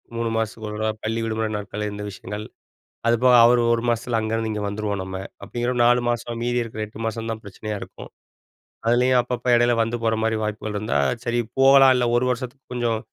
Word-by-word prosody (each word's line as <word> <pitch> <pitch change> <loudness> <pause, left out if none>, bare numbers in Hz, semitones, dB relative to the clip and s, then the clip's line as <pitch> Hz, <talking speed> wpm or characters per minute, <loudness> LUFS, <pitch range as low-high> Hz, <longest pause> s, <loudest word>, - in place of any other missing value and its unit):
3 115 0 -1
மாசத்துக்கு 110 -1 -3
ஒரு 105 - -6
தடவை 110 0 0
பள்ளி 115 +1 -1
விடுமுறை 110 -1 -1
நாட்கள்ல 105 +1 -4
இந்த 105 0 -6
விஷயங்கள். 105 +2 -7 0.6
அதுபோக 125 +2 +4
அவரு 120 0 +5
ஒரு 115 - -1
மாசத்துல 115 0 0
அங்கருந்து 110 0 -1
இங்க 105 - -3
வந்துருவோம் 100 -1 -3
நம்ம. 95 0 -6 0.2
அப்பிடிங்கிற 120 +1 -2
ஒரு 120 - +1
4 120 +1 +5
மாசம், 120 0 -2
மீதி 120 0 0
இருக்கிற 110 -1 -7
8 105 +1 -11
மாசம் 115 0 -4
தான் 110 - -5
பிரச்சனையா 105 +2 -6
இருக்கும். - - -10 0.8
அதுலயும் 125 +2 +4
அப்பப்ப 125 0 -5
இடையில 120 0 +4
வந்து 115 +1 -2
போற 110 0 +2
மாரி 110 0 +1
வாய்ப்புகள் 105 0 -3
இருந்தா 105 +2 -1 0.3
சரி 120 0 0 0.2
போகலாம், 135 0 +7
இல்ல 125 - +2
ஒரு 125 - +2
வருஷத்துக்கு 130 +2 -6
கொஞ்சம் 120 -2 0
115 Hz, 190 wpm, -23 LUFS, 110-120 Hz, 0.8 s, போகலாம்